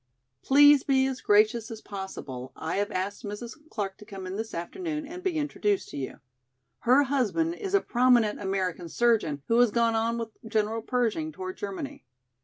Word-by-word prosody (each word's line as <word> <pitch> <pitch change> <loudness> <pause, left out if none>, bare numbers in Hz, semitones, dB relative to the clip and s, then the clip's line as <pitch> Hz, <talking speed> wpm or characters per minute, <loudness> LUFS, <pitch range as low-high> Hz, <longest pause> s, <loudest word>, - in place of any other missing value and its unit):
Please 290 +1 +7
be 265 -2 +3
as 265 -1 -3
gracious 215 +2 +3
as 225 -2 -7
possible, 150 - -7
I 160 +3 -3
have 205 0 0
asked 190 +2 -3
Mrs. 210 +3 -6 0.2
Clark 195 -2 -4
to 210 - -12
come 195 -2 -8
in 185 +1 -5
this 220 +2 -4
afternoon 305 - -4
and 350 +5 -8
be 365 -4 -1
introduced 210 -9 0
to - - -7
you. 135 -2 -5 0.6
Her 255 +4 +5
husband 280 +5 0
is 390 +2 -2
a 400 - +4
prominent 240 -4 +3
American 185 -3 -2
surgeon 205 -11 +1
who 230 +1 +3
has 245 -1 +6
gone 230 +1 +2
on 225 +1 0
with 230 -1 -4 0.2
General 220 0 0
Pershing 225 -10 -1
toward 185 +3 -6
Germany. 270 +9 -6
225 Hz, 180 wpm, -27 LUFS, 195-265 Hz, 0.6 s, Please